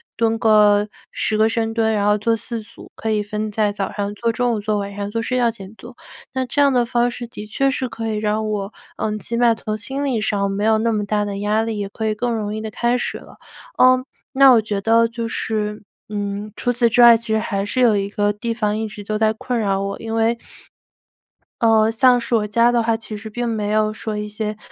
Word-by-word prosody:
蹲 225 -1 +1
个 210 -2 +4 0.2
10 215 - -1
个 220 +1 +4
深 225 0 -1
蹲， 225 -1 +1
然 205 -1 0
后 210 0 +4
做 230 +2 +1
4 230 +1 -5
组， 215 - -14
可 225 - -4
以 210 -1 +1
分 210 +1 -4
在 210 0 +1
早 200 -1 -3
上 205 0 -3
做、 230 +3 -1
中 245 +1 0
午 220 - -1
做、 210 0 -1
晚 200 0 -4
上 200 0 -4
做、 230 +2 -2
睡 250 +3 -2
觉 240 -2 +3
前 200 -3 -9
做。 240 +2 -13 0.4
那 260 -1 -1
这 285 +3 0
样 280 -1 +5
的 245 -2 +2
方 240 0 +1
式 240 0 -7
的 210 -2 -9
确 270 +6 +1
是 260 -1 -2
可 225 -1 -5
以 215 -1 -2
让 215 +1 -1
我， 205 -1 -3 0.3
呃， 215 0 -2
起 230 +2 -5
码 235 -1 +4
从 215 -1 -4
心 270 +6 -3
理 250 -6 0
上 200 -2 0
没 200 +1 -2
有 220 0 +4
那 230 +1 +1
么 210 -2 -1
大 210 0 0
的 200 -1 -4
压 210 +2 +1
力， 225 -1 -3
也 200 -1 -3
可 220 +2 -5
以 215 - +1
更 240 +3 -2
容 210 -2 -3
易 215 - -4
地 220 - -5
开 240 +3 0
始 245 - -3
了。 - - -15 0.4
呃， 255 0 +5 0.3
那 270 0 +7
我 235 -3 +5
觉 210 -2 -3
得 230 +2 +4
就 230 0 -5
是， 210 -2 -3 0.3
嗯， 205 0 -4
除 245 - 0
此 240 -1 +2
之 245 - +3
外， 235 -1 +9
其 230 - -9
实 220 - +2
还 200 -2 -2
是 255 +5 -1
有 230 -4 +4
一 200 0 -2
个 205 0 0
地 230 +3 -3
方 210 -2 -1
一 220 0 -2
直 210 -1 -9
都 215 +1 -2
在 220 0 +2
困 240 +2 -3
扰 195 -3 0
我。 200 0 -4
因 225 0 -4
为， 225 +1 +2 1.2
呃， 225 -1 +4
像 245 +2 +4
是 240 - -4
我 210 -2 +1
家 235 +3 +3
的 240 -1 +2
话， 225 0 +1
其 225 -1 -8
实 215 +1 -8
并 240 +3 -3
没 215 -3 -2
有 215 0 +1
说 215 -1 -5
一 210 0 -4
些 210 0 -4
220 Hz, 265 characters per minute, -20 LUFS, 210-235 Hz, 1.2 s, 外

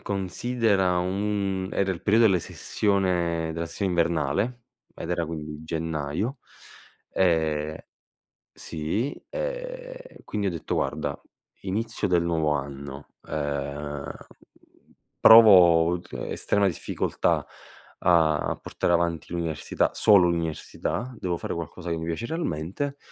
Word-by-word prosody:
considera 100 -1 0
un 95 0 -1
era 100 -1 +1
il 85 - -8
perio 105 +2 +3
delle 100 -5 +5
sessione 90 -5 0
della 85 +1 -3
sessione 95 +4 -2
invernale 85 - 0 0.3
ed 80 - -6
era 85 -1 0
quindi 75 -1 -6
gennaio. 80 - -3 0.7
Ehm, 80 -4 +1 0.8
sì, 85 - -3
ehm, - - -6
quindi 105 -1 -2
ho - - +2
detto: 85 -4 -3
"Guarda, - - -2 0.4
inizio 105 +2 -2
del 85 -1 +3
nuovo 80 -3 +1
anno, 70 0 -5 0.2
ehm, 70 -1 -3 1.1
provo 90 -6 +8
tr 85 -6 -12 0.2
estrema 100 -1 +1
difficoltà 90 - -1 0.6
a 80 -3 +3
portare 85 - -1
avanti 85 -2 0
l'università, 85 -3 -1
solo 95 -5 +6
l'università, 85 - -3
devo 90 -1 -1
fare - - -4
qualcosa 85 +1 -6
che 85 - -1
mi 80 - -4
piace 85 +7 -3
realmente". 140 - -3
85 Hz, 110 wpm, -26 LUFS, 80-100 Hz, 1.1 s, provo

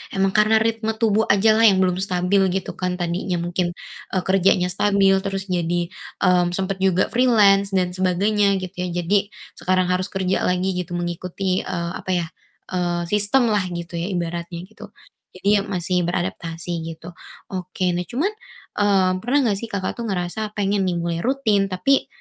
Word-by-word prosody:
emang 195 0 +2
karena 215 +2 +4
ritme 220 0 0
tubuh 220 -1 +2
ajalah 220 +2 +5
yang 190 -2 +4
belum 180 0 0
stabil 185 +1 +1 0.2
gitu 190 - -3
kan. 180 -1 -3
Tadinya 175 +1 -2
mungkin, 175 0 -2 0.4
eee, 185 - +1
kerjanya 190 -1 +2
stabil, 195 -1 +3
terus 195 0 -3
jadi, 175 0 -1 0.3
eee, 180 -1 +4
sempat 190 0 -2
juga 190 -1 +2
freelance 205 -5 +4
dan 180 -1 +1
sebagainya 195 +3 +2
gitu 185 -1 -6
ya. 180 - -1 0.2
Jadi 200 +3 +2 0.3
sekarang 185 0 +1
harus 185 +1 0
kerja 190 -1 -1
lagi 180 +1 +1
gitu 180 -1 -4
mengikuti, 180 +2 -2
eee, 170 -1 -3
apa 185 - -4
ya, 175 - 0 0.5
eee, 175 -1 -1
sistemlah 210 -1 +3
gitu 170 0 -5
ya 175 - -2
ibaratnya 170 -1 -4
gitu. 210 +2 -12 0.5
Jadi 185 - -6
ya - - -1
masih 180 -1 -1
beradaptasi 170 -1 -3 0.2
gitu. 165 +2 -11 0.4
Oke, 185 0 -2
nah 175 0 -3
cuman, 300 - -1 0.5
eee, 195 -2 +3
pernah 245 +8 0
enggak 205 -4 +1
sih 230 - -6
Kakak 200 +2 -4
tuh 230 - -3
ngerasa 200 +3 -3
pengen 200 -1 0
nih 175 - 0
mulai 170 0 -2
rutin 220 -4 +1
tapi, 230 +9 +1
185 Hz, 165 wpm, -22 LUFS, 180-205 Hz, 0.5 s, ajalah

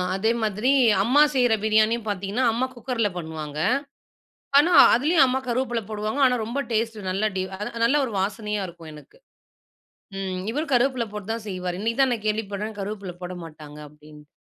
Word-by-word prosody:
அதே 220 +4 +1
மாதிரி 215 +5 +1 0.3
அம்மா 260 +7 +4
செய்ற 245 -3 +3
பிரியாணியும் 220 +1 +2
பார்த்தீங்கன்னா, 200 +5 -1
அம்மா 245 +3 0
குக்கர் 240 -1 -2
ல - - +2
பண்ணுவாங்க. 155 -3 -6 1.0
ஆனா 330 +5 +3 0.2
அதிலேயும் 290 +4 +4
அம்மா 260 +1 0
கருவேப்பில 240 -1 -1
போடுவாங்க. 215 +6 -2
ஆனா, 250 -1 +1
ரொம்ப 240 +5 -3
டேஸ்ட்டு, 220 -3 -2
நல்லா 200 +3 0
டி 185 - 0 0.2
அத 210 - -3 0.2
நல்ல 270 +5 +3
1 230 - -6
வாசனையா 210 +1 -2
இருக்கும் 165 -2 -11
எனக்கு. 150 - -15 1.0
ம் 190 -1 -3
இவரும் 300 +4 -3
கருவேப்பில 250 -1 +2
போட்டு 210 +1 -5
தான் 225 -1 -6
செய்வாரு. 180 -2 -4
இன்னக்கி 230 +3 -2
தான் 265 -1 +3
நான் 220 -2 -6
கேள்விப்பட்றேன், 210 0 -3
கருவேப்பில 195 -2 -5
போட 180 +1 -5
மாட்டாங்க 150 -2 -12
அப்பிடின்னு. 150 0 -16
215 Hz, 165 wpm, -24 LUFS, 190-240 Hz, 1.0 s, அம்மா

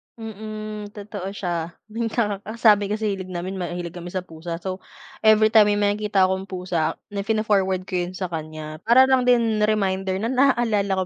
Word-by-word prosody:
Mm, 215 -1 -7
totoo 200 -2 -6
siya. 170 -3 -3 0.2
Yun 230 +1 -2
nga 210 -4 -1
ang 220 +3 -8
sabi 205 -3 +5
kasi 210 -1 -1
hilig 185 -1 -6
namin 185 +2 -4
mahilig 175 -1 -4
kami 175 0 -8
sa 185 0 -3
pusa. 165 0 -6
So, 185 +1 -5 0.4
everytime 215 -1 +6
may 205 - +2
makikita 205 -1 +2
akong 190 +1 -2
pusa 180 -4 -1 0.2
na 200 -1 -2
fino-forward 200 -4 +1
ko 195 - -10
yun 185 - -8
sa 190 - -2
kaniya. 155 -1 -6
Para 255 +3 +7
lang 260 -1 +2
din 230 -3 +3
reminder 195 -3 +1
na 230 - 0
naaalala 225 -8 +2
200 Hz, 175 wpm, -23 LUFS, 185-215 Hz, 0.4 s, Para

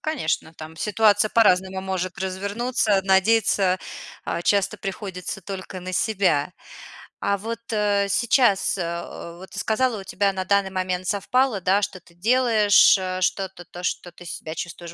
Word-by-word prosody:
Конечно, 240 - -2
там 160 0 -10
ситуация 210 +2 +3
по-разному 190 -4 +3
может 190 -1 -3
развернуться. 200 +3 0
Надеяться, 190 -1 +3 0.5
а, 170 - -3
часто 200 +1 +1
приходится 195 -2 -6
только 190 0 -7
на 185 +1 -6
себя. 185 -6 +1 0.7
А 200 0 0
вот, 230 +3 -5
э, 205 -2 +1
сейчас, 220 0 +3
э, 170 -1 -5
вот 190 +1 -12
ты - - -6
сказала, 230 0 0
у - - -10
тебя 200 +1 0
на 190 -1 -3
данный 200 0 +1
момент 185 -1 -2
совпало, 220 +3 +1
да, 195 +3 +2
что 190 -1 -3
ты 170 -1 -23
делаешь, 220 0 +5
э, 185 -1 -3
что-то, 190 -1 -2
то, 175 +2 -10
что 180 0 -3
ты 175 +1 -14
себя 160 -1 -6
чувствуешь 170 0 -7
190 Hz, 155 wpm, -23 LUFS, 185-210 Hz, 0.7 s, делаешь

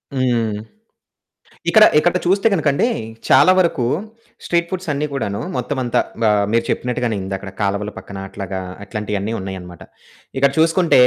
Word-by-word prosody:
హ్మ్. 115 -5 0 1.1
ఇక్కడ, 220 - +7 0.2
ఇక్కడ 175 +3 +1
చూస్తే 195 +4 +3
గనుకండీ, 155 +3 +2 0.4
చాలా 185 - +7
వరకు 165 -9 +1 0.6
స్ట్రీట్ 170 0 +1
ఫుడ్స్ 185 -3 -4
అన్ని 145 +2 -1
కూడాను, 100 -7 -2 0.2
మొత్తం 145 - -2
అంతా 120 - +1 0.2
బా 110 - +4 0.2
మీరు 115 - +2
చెప్పినట్టుగానే, 120 -2 -1
ఇందాక 95 0 -5
కాలువల 100 +1 -1
పక్కన, 100 - -9
అట్లాగా 95 -1 -5 0.3
అట్లాంటియన్ని 105 +1 -3
ఉన్నాయన్నమాట. 95 -2 -7 0.5
ఇక్కడ 140 +1 +4
చూసుకుంటే, 165 -3 +4
120 Hz, 130 wpm, -19 LUFS, 100-160 Hz, 1.1 s, ఇక్కడ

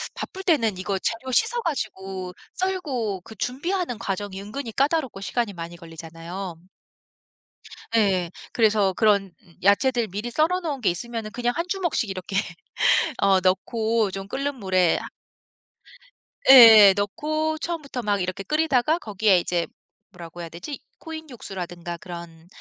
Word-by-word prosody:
바쁠 380 - -6
때는 230 - +2
이거 195 +1 -1
재료 230 +6 -3
씻어 475 - +2
가지고 190 - -4 0.2
썰고 270 - -2
그 220 +4 -13
준비하는 275 - -2
과정이 195 -2 -4
은근히 225 +4 -6
까다롭고 275 -5 0
시간이 205 +2 -2
많이 170 -1 -7
걸리잖아요. 165 +2 -8 1.4
예. 190 -5 +2 0.2
그래서 210 -4 +3
그런 200 -3 +2 0.3
야채들 235 +4 +3
미리 210 +5 -4
썰어 320 +8 +1
놓은 290 -6 -3
게 - - +3
있으면은 220 +4 -4
그냥 245 +1 -1
1 335 - -1
주먹씩 345 - -1
이렇게 190 +1 -6 0.9
어 195 -1 +5
넣고 220 +3 +1
좀 195 0 -6
끓는 275 +5 -3
물에 185 -6 +2
하 - - -6 1.4
예예. 225 -6 +10
넣고 310 +10 -1
처음부터 305 -6 -4
막 205 -3 0
이렇게 185 +2 -3
끓이다가 305 - +2
거기에 205 - +2
이제 175 -1 -1 0.4
뭐라고 175 -2 -11
해야 170 - -5
되지? 235 - -7 0.2
코인 320 -1 -8
육수라든가 175 -7 -7
그런 170 -1 -10
210 Hz, 305 characters per minute, -24 LUFS, 185-270 Hz, 1.4 s, 예예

